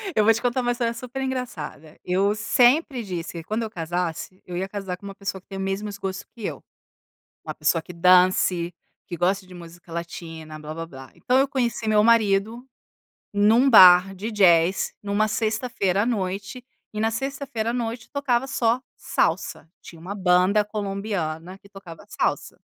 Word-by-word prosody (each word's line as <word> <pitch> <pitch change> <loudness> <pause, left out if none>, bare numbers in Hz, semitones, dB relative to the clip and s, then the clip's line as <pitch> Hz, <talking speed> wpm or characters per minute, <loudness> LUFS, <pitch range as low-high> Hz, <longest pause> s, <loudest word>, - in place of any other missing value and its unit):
Eu 215 - +4
vou 225 +2 +6
te 225 - -4
contar 250 +1 0
uma 245 - 0
história 235 -1 -1
super 250 +3 -6
engraçada, 235 - -5
eu 195 +3 +1
sempre 250 +3 +3
disse 175 -4 -5
que 170 -2 -7
quando 215 +5 -2
eu 220 - -4
casasse, 175 +1 -4
eu 180 - -7
ia 190 +2 -2
casar 195 -3 -5
com 200 - -15
uma 195 - -8
pessoa 195 -1 -5
que - - -46
tem 195 - -7
os 195 - -3
mesmos 200 +1 -3
gostos 190 -1 -5
que 225 -4 -7
eu, - - -5 0.8
uma - - -4
pessoa 165 - +1
que 180 - -11
dance, 180 0 +3 0.3
que 175 - -6
gosta 190 +2 0
de 185 - -13
música 175 0 -13
latina, 165 -2 -7
blábláblá, 155 -3 -8
então 250 +1 +1
eu 275 - +3
conheci 240 -4 -2
meu 210 -1 +4
marido 220 +1 +2 0.7
num 220 +6 +4
bar 185 -3 +8
de 215 +5 -5
jazz 180 -3 +3
numa 205 +1 +1
sexta-feira 215 -3 0
à - - -1
noite 200 +1 -3 0.3
e 210 - -4
na 225 +1 +1
sexta-feira 250 -2 -3
à - - -5
noite 235 -1 -4
tocava 270 -3 0
só 245 -2 +1 0.2
salsa, 160 - -1
tinha 165 - -13
uma 185 +5 -6
banda 185 +2 +3
colombiana 195 -5 -4
que 200 - -20
tocava 195 -5 -12
salsa. - - -2
200 Hz, 175 wpm, -24 LUFS, 180-230 Hz, 0.8 s, bar